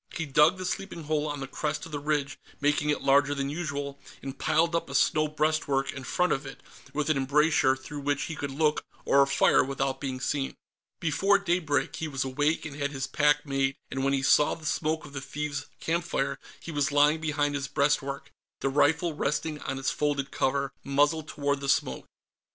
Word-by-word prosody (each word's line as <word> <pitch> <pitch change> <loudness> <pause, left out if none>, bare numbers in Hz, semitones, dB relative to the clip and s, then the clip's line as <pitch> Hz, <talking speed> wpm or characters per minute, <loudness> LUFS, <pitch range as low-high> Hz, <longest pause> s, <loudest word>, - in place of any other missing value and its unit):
He 165 - -2
dug 150 +5 +4
the 185 - -5
sleeping 180 -2 -4
hole 155 0 0
on 145 -1 -4
the 135 - -4
crest 150 +2 -3
of 165 - -11
the 145 - -3
ridge, 145 -2 -1 0.2
making 145 +1 +1
it 150 - 0
larger 140 +1 +4
than 140 0 -2
usual, 145 -3 -4 0.2
and 135 0 -5
piled 160 +4 +2
up 170 - -1
a 140 - -5
snow 155 +3 +3
breastwork 150 -3 0
in 130 - -7
front 180 +7 +1
of 135 - -2
it, 135 -1 -10 0.3
with 150 +1 0
an 150 - +1
embrasure 140 0 +3
through 140 +2 -8
which 145 0 0
he 160 - -4
could 145 - -4
look 150 +2 +1 0.2
or 140 0 +5
fire 140 0 +4
without 135 0 -2
being 130 -2 -3
seen. 135 +1 -2 0.4
Before 195 +6 +3
daybreak, 175 -6 0
he 160 - -3
was 140 -3 -2
awake 145 +5 0
and 150 -3 -6
had 145 -1 -1
his 135 -2 -3
pack 145 +1 +2
made, 135 -1 0 0.2
and 135 0 -2
when 135 0 +2
he 135 -1 0
saw 145 +1 +4
the 160 - -13
smoke 155 +1 -1
of 140 - -12
the 135 - -4
thieves' 145 +1 -4
campfire, 165 -4 -1 0.2
he 170 - -7
was 145 -2 0
lying 145 +2 +4
behind 145 -2 0
his 140 -1 -2
breastwork, 140 -1 0 0.3
the 135 - +1
rifle 160 +4 +2
resting 150 +1 -2
on 135 - -4
its 135 0 0
folded 140 -2 -1
cover, 140 +1 0
muzzle 145 +3 +2
toward 140 -2 -2
the 140 - -3
smoke. - - 0
145 Hz, 200 wpm, -28 LUFS, 140-155 Hz, 0.4 s, or